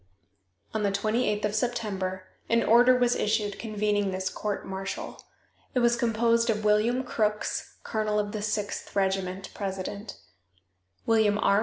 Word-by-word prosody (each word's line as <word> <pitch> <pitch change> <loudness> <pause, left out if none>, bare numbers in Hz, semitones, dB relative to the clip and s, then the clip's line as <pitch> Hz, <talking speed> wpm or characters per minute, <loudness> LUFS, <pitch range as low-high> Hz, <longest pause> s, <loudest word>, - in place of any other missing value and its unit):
On 220 - -1
the 200 -1 +1
28th 210 +1 0
of 210 - -1
September 205 -5 -2 0.3
an 230 0 +3
order 245 +2 +6
was 245 -1 +3
issued 205 -1 0
convening 210 -2 0
this 185 0 -2
court 210 -2 -3
martial. 190 0 -5 0.5
It - - +4
was 235 0 +4
composed 230 0 +2
of 215 -1 0
William 220 +5 +3
Crooks, 215 -4 -1
colonel 215 -2 -1
of 205 -1 0
the 215 -1 -4
Sixth 210 -1 -3
Regiment, 190 -1 -1
president; 200 +1 -5 0.9
William 220 -2 +3
R. 200 -1 +3
210 Hz, 140 wpm, -27 LUFS, 200-230 Hz, 0.9 s, order